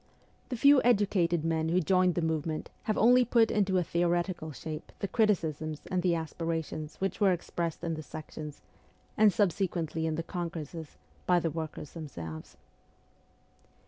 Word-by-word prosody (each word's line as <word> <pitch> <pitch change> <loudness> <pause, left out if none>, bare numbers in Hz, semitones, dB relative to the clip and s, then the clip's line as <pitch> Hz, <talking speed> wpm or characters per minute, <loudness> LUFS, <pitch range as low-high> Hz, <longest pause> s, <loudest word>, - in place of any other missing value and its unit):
The 250 - -3
few 280 +2 +6
educated 190 -8 +2
men 160 -1 0
who 175 +2 +3
joined 185 +1 +3
the 175 - 0
movement 160 -1 -2
have 215 - 0
only 250 +3 +6
put 230 -1 +3
into 195 -3 +2
a 180 - +2
theoretical 175 -1 0
shape 155 +2 -7
the 200 - -3
criticisms 160 -9 0
and 185 -1 +1
the 175 -1 +2
aspirations 160 -1 -3
which 195 +2 -3
were 200 -2 +5
expressed 170 -1 -3
in 165 -1 -1
the 155 - -4
sections, 155 -1 -8 0.5
and 215 -1 +6
subsequently 170 -5 0
in 160 - -1
the 165 - -2
congresses, 165 -3 -6 0.3
by 180 -1 +5
the 165 -1 -1
workers 155 -2 -6
themselves. 85 - -8
170 Hz, 150 wpm, -30 LUFS, 160-190 Hz, 0.5 s, few